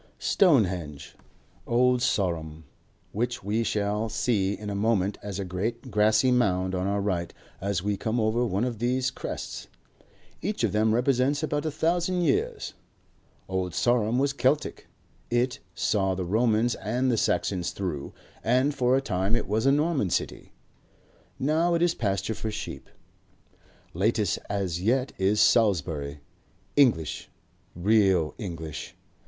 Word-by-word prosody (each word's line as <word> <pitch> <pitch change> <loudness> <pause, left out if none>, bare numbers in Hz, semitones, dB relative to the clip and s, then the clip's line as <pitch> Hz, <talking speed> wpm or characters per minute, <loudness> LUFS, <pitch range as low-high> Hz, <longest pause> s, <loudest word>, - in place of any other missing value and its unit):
Stonehenge. 95 - +1 0.5
Old 125 +1 +3
Sarum, 85 -9 -1 0.5
which 120 +2 -2
we 105 +3 0
shall 105 0 -1
see 105 -4 0
in 105 -1 -6
a - - -3
moment 100 -2 +1
as 100 -2 -5
a 100 - -3
great 115 +8 -4
grassy 110 +4 +3
mound 95 -6 +1
on 90 +1 -1
our 100 +1 0
right 90 -4 -1 0.3
as 100 -2 -1
we 100 0 0
come 110 +4 -1
over 110 +2 +1
one 100 -2 0
of 120 -4 -2
these 125 +2 0
crests. - - -6 0.7
Each 205 +4 -2
of - - +2
them 110 +1 +2
represents 135 +4 +1
about 150 0 -1
a - - -1
thousand 175 +4 0
years. 155 -6 0 0.7
Old 95 -2 -2
Sarum 120 -1 +2
was 140 +1 +1
Keltic; 140 +2 0 0.4
it, 120 +1 0 0.2
saw 95 +1 +1
the 90 -1 -3
Romans 110 +4 +2
and 125 +4 -1
the - - +2
Saxons 95 -4 0
through, 85 -8 -4 0.3
and 130 +5 +2
for 130 -1 +2
a - - +1
time 95 -2 0
it - - -2
was 110 +5 +1
a - - +6
Norman 145 - +1
city. - - -3 0.9
Now 160 +5 +2
it 170 - +2
is 175 -1 +3
pasture 100 - -1
for 110 - -4
sheep. 105 -10 -6 1.0
Latest 105 +1 +1
as 95 -4 -2
yet 125 +6 +1
is 100 +2 +2
Salisbury, 80 -10 +2 0.5
English, 105 - +2 0.5
real 95 -3 +3
English. 80 -7 -6
110 Hz, 140 wpm, -27 LUFS, 95-125 Hz, 1.0 s, a